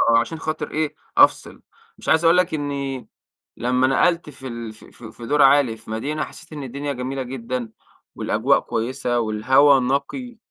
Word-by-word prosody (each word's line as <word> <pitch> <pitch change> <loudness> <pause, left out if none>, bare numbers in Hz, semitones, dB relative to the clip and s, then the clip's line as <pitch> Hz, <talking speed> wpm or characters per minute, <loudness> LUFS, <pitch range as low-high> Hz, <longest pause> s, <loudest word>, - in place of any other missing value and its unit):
آه - - +6
عشان 155 +8 -3
خاطر 155 -1 -4
إيه، 155 -1 -2 0.2
أفصل، - - +3 0.4
مش - - -6
عايز 160 +1 +4
أقول 165 +2 +6
لَك 180 -2 +2
إنّي 140 -3 -3 0.5
لمّا 125 +2 +2
نقلت 170 +5 +2
في 135 -2 -10
ال 115 -2 -6
في 110 - -17
في 115 -2 -12
في 115 - -10
دور 145 +4 +2
عالي 135 -4 +5
في 110 - -16
مدينة 140 +8 -2
حسّيت 165 -1 -11
إن 145 -2 -6
الدنيا 140 +3 -4
جميلة 130 +1 -4
جدًا، 125 -2 -5 0.4
والأجواء - - +2
كويّسة 120 +1 -2
والهوا 130 +6 +4
نقي، 230 - -2
135 Hz, 170 wpm, -22 LUFS, 120-150 Hz, 0.5 s, آه